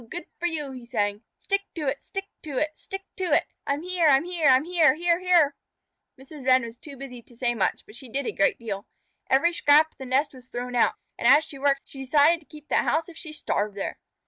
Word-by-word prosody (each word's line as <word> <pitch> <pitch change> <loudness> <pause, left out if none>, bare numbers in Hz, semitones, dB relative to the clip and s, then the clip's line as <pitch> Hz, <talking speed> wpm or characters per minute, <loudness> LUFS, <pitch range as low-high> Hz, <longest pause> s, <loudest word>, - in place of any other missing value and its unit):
Good 350 - -6
for 350 - 0
you!" 300 -5 -3
he 255 -2 -9
sang. 205 -3 -1 0.2
"Stick 395 0 0
to 310 -4 -3
it! 270 +1 -2
Stick 390 0 -5 0.2
to 295 -5 -6
it! 305 +3 +1
Stick 390 +4 -7
to 375 - -1
it! - - +4 0.2
I'm 280 +3 -1
here! 360 -2 +2
I'm 275 -1 +5
here! 345 -3 0
I'm 260 +1 +6
here, 335 -2 +4
here, 340 +1 +1
here!" 345 -6 +4 0.6
Mrs. 275 +1 -11
Wren 260 0 +4
was 230 0 -7
too 280 +2 -11
busy 250 -2 -9
to 235 0 -20
say 240 -1 +1
much, 215 -5 -1
but 215 - -13
she 260 0 -9
did 275 +3 -2
a - - -1
great 195 - +2
deal. 210 -3 -6 0.4
Every 280 +6 +3
scrap 310 -1 +5
of - - -35
the 265 - -7
nest 270 +4 +1
was 255 -1 -14
thrown 245 +1 -5
out, 240 - +3 0.2
and 235 - +1
as 285 +5 +7
she 290 -3 -8
worked 275 0 +2
she 270 - -11
decided 295 +5 +4
to 310 - -24
keep 300 -1 -14
that - - +2
house 320 +2 0
if 340 - -12
she 320 -1 -8
starved 210 -8 -2
there. 195 - -4
280 Hz, 245 wpm, -26 LUFS, 255-325 Hz, 0.6 s, as